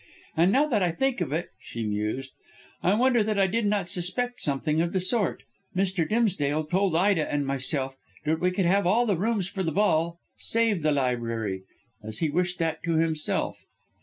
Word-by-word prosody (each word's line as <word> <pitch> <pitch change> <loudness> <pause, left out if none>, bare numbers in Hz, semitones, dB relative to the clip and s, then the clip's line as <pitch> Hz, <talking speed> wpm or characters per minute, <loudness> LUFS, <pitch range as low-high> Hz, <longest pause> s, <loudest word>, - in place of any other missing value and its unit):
And, 170 +4 +4
now 275 +7 +4
that 235 -9 +1
I 180 - +3
think 250 +6 0
of 160 - -1
it," 165 +4 -2
she 115 -1 -6
mused, 105 +6 -2 0.5
"I 185 +3 +3
wonder 245 0 +4
that 210 0 -1
I 195 - +5
did 210 +3 0
not 200 -3 0
suspect 185 +8 -2
something 150 +2 +1
of 170 0 -1
the 190 - +2
sort. 200 +2 0 0.3
Mr. 185 -3 0
Dimsdale 160 -10 +1
told 180 +3 +1
Ida 185 -2 +2
and 145 -1 0
myself 135 0 -1 0.3
that 160 +1 +1
we 180 - +2
could 185 0 0
have 195 +1 +3
all 230 +6 +3
the 205 -4 +2
rooms 205 +1 0
for 195 0 -4
the 165 -3 0
ball 170 -2 +2 0.2
save 225 -5 +1
the 155 0 +2
library, 115 -8 -1 0.4
as 110 0 -6
he 160 -3 0
wished 180 +2 0
that 160 -2 -1
to 165 -1 0
himself." 160 -1 -1
175 Hz, 190 wpm, -27 LUFS, 150-200 Hz, 0.5 s, I